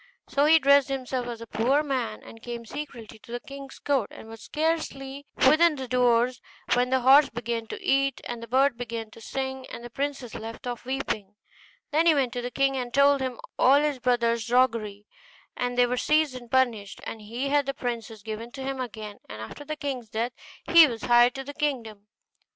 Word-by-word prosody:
So 285 +1 +2
he 320 +2 +7
dressed 280 -2 +5
himself 255 -2 -3
as 235 -1 -6
a - - -6
poor 255 +7 +1
man, 250 -7 -3
and 225 - -13
came 235 -1 -6
secretly 235 -5 -8
to 230 - -15
the 240 - -3
king's 275 +1 -10
court, 275 -7 0
and - - -11
was 225 0 -11
scarcely 285 -3 -2 0.2
within 315 +3 +5
the 265 -2 -6
doors 245 0 +2 0.3
when 245 0 +2
the 260 0 +2
horse 275 +3 +7
began 230 -1 -4
to - - -6
eat, 275 -1 +1
and 240 -1 -6
the 230 - -8
bird 260 +1 +2
to 230 -2 -6
sing, 265 +2 -4
and 235 - -8
the 240 - -9
princess 275 -2 -3
left 225 +2 -7
off 245 0 -5
weeping. 220 -6 -3 0.6
Then 320 +3 +3
he 320 - +6
went 260 -4 +1
to 245 - -3
the 245 - -4
king, 275 +1 +1
and 250 -2 -3
told 280 +1 +4
him 255 -2 -3 0.2
all 270 +3 +6
his 295 -3 0
brothers' 235 -2 +1
roguery; 225 -5 +1 0.5
and 245 0 -2
they 245 - +6
were 250 +1 -1
seized 305 +1 +2
and 245 -2 -9
punished, 235 -6 +1
and 225 - -6
he 235 +6 -4
had 285 -1 +2
the 275 - -1
princess 230 -4 -5
given 220 +2 -6
to 270 -2 -6
him 270 -1 -3
again; 215 -4 -7
and 105 - -8
after 110 - -8
the 305 +1 -4
king's 265 -6 -5
death 230 +3 -2 0.3
he 335 -2 +8
was 230 -4 -6
heir 240 0 +6
to 270 +1 -7
his 285 +2 -8
kingdom. 225 -8 -2
250 Hz, 205 wpm, -26 LUFS, 230-275 Hz, 0.6 s, he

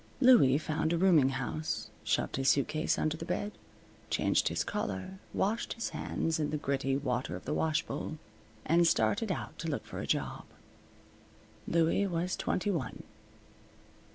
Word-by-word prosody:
Louie 240 - +7
found 155 +1 -1
a - - +2
rooming 165 -7 +5
house, 135 +4 -3
shoved - - 0
his 135 0 +2
suitcase 155 +3 +1
under 155 0 0
the 160 - -7
bed, 205 +4 -2 0.6
changed - - +2
his - - 0
collar, 190 - -4
washed 215 +4 0
his 230 - -3
hands 165 0 -2
in 150 - 0
the 150 - -1
gritty 135 -1 0
water 125 -8 -2
of 90 - -9
the - - -1
wash 155 -1 +1
bowl, 150 +2 -5 0.5
and 170 +2 +4
started 220 +4 +2
out 185 - -5
to 165 - -4
look 145 -4 -2
for - - -7
a - - -4
job. - - -1 1.2
Louie 170 +4 +2
was 175 0 -1
twenty 185 +3 -1
one. 155 -9 -3
160 Hz, 155 wpm, -31 LUFS, 140-185 Hz, 1.2 s, Louie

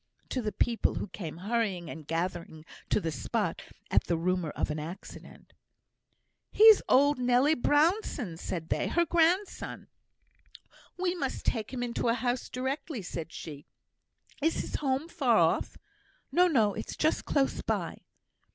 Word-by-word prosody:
(to 255 - -1
the 215 -2 -2
people, 230 +3 +1
who - - -2
came 170 -4 -7
hurrying 210 -6 -1
and 160 -2 -8
gathering 165 -1 -3 0.2
to - - +3
the 165 -5 -2
spot 125 -7 -2 0.3
at - - +3
the 170 - 0
rumour 180 -1 0
of 150 - -2
an 150 - -3
accident). 165 +5 -10 1.0
"He's 435 -1 +8
old 285 0 +5
Nelly 250 +4 +4
Brownson's," 290 - +1
said 165 -3 -4
they. - - 0
"Her 345 0 +2
grandson." 345 +4 0 1.1
"We 360 -1 0
must 280 -7 -4
take 220 -3 -1
him 250 -2 -3
into 240 0 -2
a 230 - +3
house 245 0 -2
directly," 265 - -3
said 165 -2 -6
she. 145 -3 -9 0.7
"Is 320 +3 +1
his - - -6
home 275 +2 -1
far 270 -9 +2
off?" 165 -1 +2 0.5
"No, 360 +1 +5
no; 225 - +3
it's - - -6
just 315 - +1
close 275 -2 +1
by." - - -3
240 Hz, 150 wpm, -29 LUFS, -, 1.1 s, He's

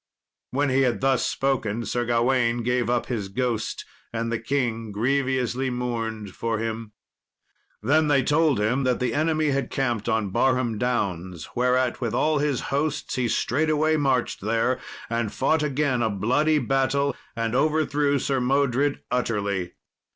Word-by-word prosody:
When 145 +2 0
he 130 +1 +3
had 125 -3 +1
thus 135 -2 +2
spoken, 120 -5 -1
Sir 120 0 -1
Gawain 120 0 +2
gave 125 -1 0
up 120 -1 +1
his 105 -6 -3
ghost, 115 0 -2 0.3
and 115 0 -2
the 115 - -1
king 115 -3 -2
grievously 130 +2 0
mourned 115 -4 -3
for 115 -1 -2
him. 110 -1 -4 0.9
Then 155 +6 +3
they 140 -3 +3
told 150 -3 +2
him 120 +6 +1
that 125 -1 +1
the 125 -2 0
enemy 155 0 +1
had 135 -3 -1
camped 120 -5 -1
on 110 -3 0
Barham 125 -2 +1
Downs, 95 -9 -2
whereat, 125 +1 +1
with 120 -2 -1
all 150 +3 +2
his 145 -3 0
hosts, 145 +1 -1
he 125 -2 0
straightway 155 +6 +1
marched 135 -4 0
there, 115 +5 +1 0.3
and 115 -2 -1
fought 160 -1 +1
again 140 -3 0
a 110 - +2
bloody 130 +10 +2
battle, 140 0 +1 0.2
and 115 0 -1
overthrew 145 0 +2
Sir 135 0 0
Modred 135 +2 +1
utterly. 100 -7 -1
125 Hz, 150 wpm, -25 LUFS, 115-140 Hz, 0.9 s, he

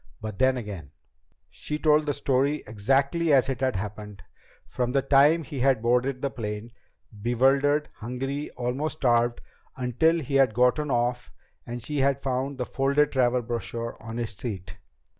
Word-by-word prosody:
But 110 -4 -7
then 130 0 +3
again... 100 - -7 0.6
She 150 - -5
told 150 0 +3
the 145 - 0
story 140 +3 0
exactly 140 +10 +1
as 135 -1 +4
it 135 -1 -3
had 130 -4 +1
happened. 105 0 -6 0.4
From 125 -1 -2
the 135 -1 +2
time 145 +4 +4
he 145 -2 -7
had 130 -3 +2
boarded 125 +3 +1
the 140 - +1
airplane, 105 0 -5 0.5
bewildered, 135 +5 +2
hungry, 135 +5 -4
almost 130 +6 -2
starved, 120 -3 +2 0.4
until 135 +7 +2
he 140 -2 -6
had 135 -5 +4
gotten 125 +5 +2
off 120 - -1 0.4
and 120 0 -5
she 150 +3 -2
had 135 0 +2
found 135 +1 -2
the 125 - -2
folded 140 +3 +1
travel 125 -2 +2
brochure 115 0 -4
on 115 +1 -7
his 115 -2 -3
seat. 100 -3 -6
125 Hz, 160 wpm, -26 LUFS, 120-140 Hz, 0.6 s, as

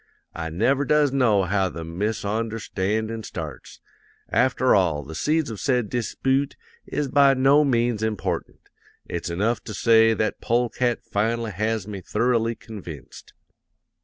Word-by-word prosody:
I 80 -1 -4
never 125 - +1
does 150 0 +3
know 120 -7 +3
how 95 0 +1
the 85 -1 -7
misonderstandin' 110 +3 -2
starts. - - -8 0.5
After 130 0 +3
all, 85 -7 +2
the 75 +4 -9
seeds 150 - 0
of 105 - -7
said 125 -6 0
dispoote 135 +3 0 0.3
is 150 -1 -2
by 140 0 +5
no 135 +3 +5
means 120 -5 +1
important; 110 -2 -3 0.4
it's 85 0 -4
enough 105 +8 -1
to 105 - -6
say 115 0 +5
that 110 +1 -2
polecat 120 0 0
finally 115 +2 -1
has 110 +1 -2
me 100 -3 -6
thoroughly 115 +2 0
convinced. 85 - -10
115 Hz, 135 wpm, -24 LUFS, 100-125 Hz, 0.5 s, by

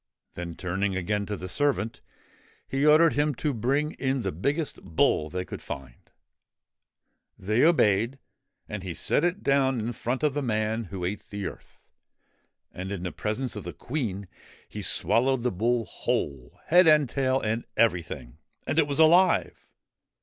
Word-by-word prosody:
Then 85 -1 -6
turning 95 +2 -2
again 100 +2 -1
to 105 - -3
the 90 - -6
servant, 115 +1 -1 0.7
he 135 +2 +1
ordered 155 +2 +6
him 145 0 +1
to 150 +3 -1
bring 135 +7 0
in 130 -2 0
the - - -1
biggest 140 - -2
bull 80 -1 +1
they 90 +2 -4
could - - -8
find. 65 -3 -9 1.3
They 110 +5 +1
obeyed, 115 - +3 0.5
and 95 -5 -5
set - - +1
it 175 +3 0
down 135 -2 +2
in 115 +2 -3
front 125 +5 -3
of 150 -3 +2
the 145 - -1
man 110 -2 -1
who 95 -1 -5
ate 100 +4 -3
the 100 -1 -5
earth. - - -9 0.9
And, 95 +2 -6
in 90 -3 -4
presence 120 +5 -3
of - - -6
the - - -6
Queen, 110 -8 -4 0.4
he - - -7
swallowed 130 +1 +2
the 125 - +1
bull 115 +5 0
whole, 70 -9 -3
head 180 +1 +6
and 150 -3 +6
tail 130 +1 +1
and 110 0 -2
everything; 85 - 0 0.3
and 160 - +1
it 150 - +3
was 140 - -2
alive 170 +4 +4
115 Hz, 155 wpm, -27 LUFS, 95-140 Hz, 1.3 s, ordered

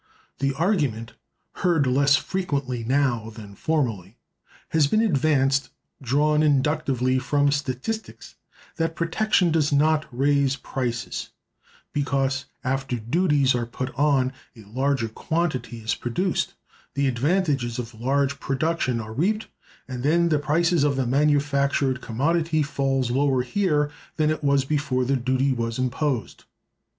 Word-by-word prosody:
The 140 0 0
argument—heard 160 - -1
less 140 +3 +4
frequently 140 -9 -2
now 120 -3 +1
than 105 -2 -11
formerly—has 125 - -2
been 215 +9 +2
advanced, 140 -8 +2 0.3
drawn 150 +4 +2
inductively 135 -3 +1
from 140 +2 +1
statistics, 140 - -4 0.4
that 165 -1 -1
protection 175 +1 +1
does 155 -2 +2
not 155 +2 +2
raise 140 +1 +2
prices; 125 -3 -4 0.6
because, 135 -2 0 0.2
after 135 0 -1
duties 140 +3 +2
are 120 -1 -1
put 130 +2 -5
on, 135 -1 +2 0.2
a 110 - -13
larger 130 +3 -1
quantity 125 -3 -2
is 110 0 -1
produced, 180 +10 -1 0.4
the 140 0 +1
advantages 135 -2 0
of 120 -1 -5
large 140 +2 +1
production 135 -3 -1
are 110 0 -6
reaped, 205 - 0 0.4
and 125 -2 -5
then 170 +5 +3
the 155 -2 +2
price 160 +4 +1
of 145 -1 +2
the 135 -1 0
manufactured 140 -1 +1
commodity 155 +6 0
falls 135 -3 0
lower 135 -1 +2
here 150 0 0 0.2
than 155 -1 +2
it 155 - -3
was 140 -1 +2
before 135 -3 0
the 135 +2 +1
duty 130 +2 +1
was 115 -2 -3
imposed. 130 0 -2
140 Hz, 125 wpm, -24 LUFS, 125-150 Hz, 0.6 s, less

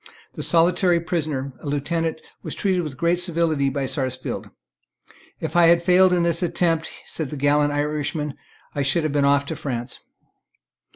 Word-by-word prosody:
The - - -6
solitary 175 +1 +3
prisoner, 155 -5 -3
a - - -9
lieutenant, 160 +3 -2 0.2
was - - -5
treated 190 -3 +1
with 150 -6 -6
great 170 +3 +1
civility 165 -5 +1
by 135 0 -2
Sarsfield. 130 -2 -3 0.9
"If - - -5
I 175 -1 +6
had 170 0 +4
failed 185 +1 +5
in 175 -1 +2
this 170 0 +1
attempt," 165 -2 0 0.2
said 155 -4 -4
the 150 - -6
gallant 145 +1 +2
Irishman, 150 0 -2 0.4
"I 145 - -2
should 140 +5 +1
have 155 - 0
been 145 -1 +2
off 140 0 +3
to - - -4
France." 120 -3 -5
155 Hz, 165 wpm, -23 LUFS, 140-170 Hz, 0.9 s, I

